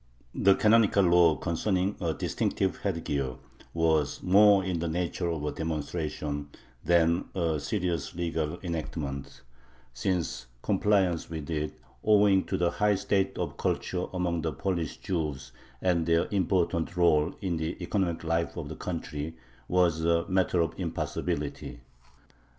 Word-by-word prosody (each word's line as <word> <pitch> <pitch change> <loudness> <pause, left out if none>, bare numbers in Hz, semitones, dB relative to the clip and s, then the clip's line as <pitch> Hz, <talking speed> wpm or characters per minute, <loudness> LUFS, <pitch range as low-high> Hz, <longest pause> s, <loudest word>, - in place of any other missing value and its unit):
The 95 0 +4
canonical 105 -2 +4
law 85 -3 +5
concerning 95 +4 0
a 85 -2 0
distinctive 95 +4 -1
headgear 75 -9 -2 0.4
was 80 -2 +1
more 100 +1 +6
in 90 -2 -2
the 85 - -1
nature 85 +1 -1
of 80 -3 -3
a 75 - -1
demonstration 75 -2 -3 0.3
than 85 0 +3
a 85 -4 0
serious 90 +1 -2
legal 85 -1 -2
enactment, 75 -5 -4 0.5
since 80 -2 -2 0.2
compliance 95 -5 +2
with 80 -1 -5
it, 75 -1 -3 0.2
owing 100 -3 +5
to - - -2
the 85 -1 +1
high 105 -1 +2
state 95 0 0
of - - -3
culture 90 -1 -1
among 90 -2 -1
the 80 -1 -2
Polish 85 +2 -2
Jews 75 -7 -3 0.3
and 85 -3 +2
their 85 0 +3
important 90 -4 +1
rôle 85 -2 +3
in 90 -5 -2
the 80 +1 -3
economic 90 -2 -1
life 85 +1 -1
of 75 -4 -5
the 80 - -6
country, 80 -2 -5 0.3
was 85 -3 +2
a 85 0 +2
matter 90 -2 +2
of 80 - 0
impossibility. 70 -4 -3
85 Hz, 135 wpm, -28 LUFS, 80-95 Hz, 0.5 s, more